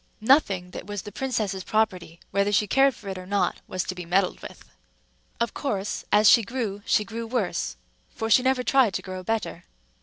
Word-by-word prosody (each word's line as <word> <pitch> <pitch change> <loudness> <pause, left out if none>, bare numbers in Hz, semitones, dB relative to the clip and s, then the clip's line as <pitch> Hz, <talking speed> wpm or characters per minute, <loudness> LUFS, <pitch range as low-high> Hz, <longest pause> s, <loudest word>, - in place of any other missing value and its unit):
Nothing 205 - +3
that - - -8
was 205 -2 -5
the 205 - -8
princess's 215 -6 -2
property, 185 -6 -1
whether 200 +1 +1
she 210 +1 +3
cared 270 +4 +3
for 210 - -13
it 190 -1 -5
or 180 - -10
not, 195 -2 0
was 185 -1 -2
to - - -4
be 180 -1 -7
meddled 185 +2 0
with. - - -11 0.7
Of 235 -1 -1
course, 205 -8 -3
as 210 +1 +5
she 230 - +8
grew, 215 -3 -4
she 210 - +3
grew 230 +2 -6
worse; 225 -5 -2 0.3
for 225 - -4
she 225 +3 +5
never 260 0 +1
tried 250 -8 +3
to - - -3
grow 185 -1 -6
better. 220 +2 -3
205 Hz, 200 wpm, -25 LUFS, 190-230 Hz, 0.7 s, she